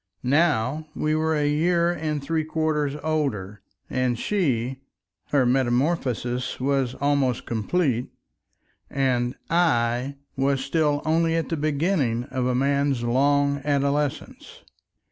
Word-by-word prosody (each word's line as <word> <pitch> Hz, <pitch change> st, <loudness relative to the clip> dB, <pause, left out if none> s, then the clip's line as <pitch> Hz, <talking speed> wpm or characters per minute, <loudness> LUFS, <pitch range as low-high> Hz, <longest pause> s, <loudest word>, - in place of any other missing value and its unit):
Now 145 Hz, 0 st, +1 dB
we 155 Hz, 0 st, 0 dB
were 160 Hz, 0 st, +1 dB
a 150 Hz, -1 st, +1 dB
year 170 Hz, +3 st, +2 dB
and 155 Hz, -3 st, -3 dB
three 160 Hz, +2 st, 0 dB
quarters 155 Hz, -2 st, -1 dB
older, 125 Hz, -11 st, -2 dB, 0.3 s
and 130 Hz, -2 st, 0 dB
she—her 135 Hz, -, -2 dB
metamorphosis 125 Hz, -1 st, 0 dB
was 135 Hz, -1 st, 0 dB
almost 140 Hz, -3 st, 0 dB
complete, 125 Hz, +2 st, 0 dB, 0.8 s
and 125 Hz, -2 st, 0 dB, 0.2 s
I 130 Hz, -6 st, +1 dB, 0.2 s
was 135 Hz, 0 st, 0 dB
still 150 Hz, -1 st, +1 dB
only 165 Hz, +1 st, +2 dB
at 165 Hz, -, -1 dB
the 165 Hz, -, 0 dB
beginning 145 Hz, -5 st, 0 dB
of 125 Hz, -1 st, -1 dB
a 125 Hz, -, +1 dB
man's 140 Hz, -1 st, +1 dB
long 140 Hz, +3 st, +2 dB
adolescence. 145 Hz, 0 st, -2 dB
140 Hz, 110 wpm, -24 LUFS, 125-155 Hz, 0.8 s, year